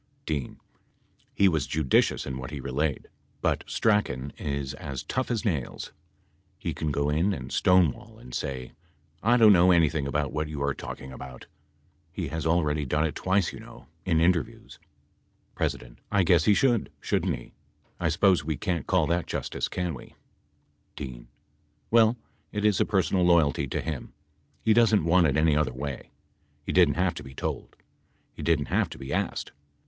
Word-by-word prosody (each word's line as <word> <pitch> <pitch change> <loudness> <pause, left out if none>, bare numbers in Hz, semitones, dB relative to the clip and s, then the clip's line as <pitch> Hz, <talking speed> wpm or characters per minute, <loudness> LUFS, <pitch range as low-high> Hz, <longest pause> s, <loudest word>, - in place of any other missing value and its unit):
D. 75 -5 -3 0.8
He 100 - +3
was 80 -7 +1
judicious 75 -4 +2
in 65 -1 -5
what 65 - -6
he 75 -1 -6
relayed, 70 +2 -2 0.3
but - - 0
Strachan 70 - 0
is 70 -2 -3
as 70 0 -6
tough 130 - -2
as 120 -1 -1
nails. 75 - -2 0.7
He - - -3
can 80 -1 -2
go 70 0 0
in 85 +7 +2
and 65 -6 -7
stonewall 90 -6 +2
and. 60 - -13
say,?'/ 65 -2 -4 0.5
don't 110 -1 +6
know 90 0 +5
anything 80 -5 +3
about 75 0 -1
what 75 0 -1
you 75 -2 -5
are 70 0 +1
talking 65 0 -8
about.'" 65 -1 -10 0.7
He - - -4
has 80 +1 -3
already 75 -3 +1
done 75 +3 +1
it 80 - -2
twice 95 -1 0
you - - -9
know, - - -14
in 80 -2 +2
interviews. 85 -3 0 0.8
86 - - 0
P. - - -15 0.2
I 100 -2 +3
guess 85 -2 +4
he 105 - +5
should, 120 -3 +2
shouldn't - - 0
he? - - -12 0.5
I - - +1
suppose 95 -7 +3
we 75 -1 -2
can't 85 -1 -2
call - - +3
that 85 +1 0
justice, - - -3
can 90 -2 -3
we? 65 - -11 0.8
IX 65 -4 -7 0.7
Well, 115 +1 +5 0.3
it 105 0 -2
is 105 -3 +3
a - - +4
personal 95 -2 +1
loyalty 80 -5 +3
to - - -2
him. 75 -5 -5 0.5
He 110 - +4
doesn't 110 -6 +4
want 85 0 +4
it 70 0 +1
any 75 -1 +3
other 75 -2 +1
way. 70 0 -6 0.6
He - - -2
didn't 85 -6 +4
have 90 +1 +1
to - - -8
be 65 0 -12
told. - - -4 0.6
He - - -9
didn't 80 -4 +1
have - - +2
to - - -9
be 70 +1 -6
asked. - - -2
80 Hz, 175 wpm, -27 LUFS, 70-90 Hz, 0.8 s, don't